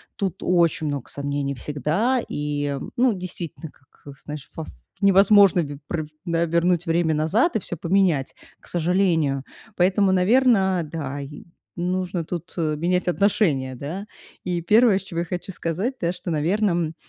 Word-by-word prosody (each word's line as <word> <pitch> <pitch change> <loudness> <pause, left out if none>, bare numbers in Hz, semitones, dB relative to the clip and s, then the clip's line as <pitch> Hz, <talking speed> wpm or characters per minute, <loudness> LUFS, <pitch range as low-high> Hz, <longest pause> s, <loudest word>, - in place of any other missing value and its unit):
тут 195 -5 -2
очень 170 -3 +2
много 140 -4 -4
сомнений 140 0 -3
всегда. 165 - 0
И 145 -1 -2 0.2
ну 250 -1 +4
действительно, 175 -4 -7
как, 140 +1 -16
знаешь, 150 -2 -7
вов 160 - -6 0.4
невозможно 195 -1 +6
ве 145 -2 -6
про 155 -3 -2 0.2
да, 170 -1 +1
вернуть 170 +1 +1
время 165 -1 +1
назад 210 - +2
и - - +3
всё 175 - -5
поменять, 170 -6 +1 0.2
к - - -19
сожалению. 165 -6 +1 0.3
Поэтому, 190 +2 +3
наверно, 190 -2 +3
да, 145 -4 -4
и, 145 +2 -9 0.3
нужно 180 0 -1
тут 175 +1 -6
менять 170 +3 0
отношение, 175 -9 +1
да. 165 +11 -6 0.4
И 175 -2 -2
первое, 215 +2 +4
с - - -11
чего 170 -3 -4
я - - -3
хочу 180 +2 -5
сказать 185 - -2
да, 170 0 +1
что, 180 0 -7
наверно, 175 +7 +1
м, 165 -2 -1
175 Hz, 150 wpm, -23 LUFS, 150-190 Hz, 0.4 s, невозможно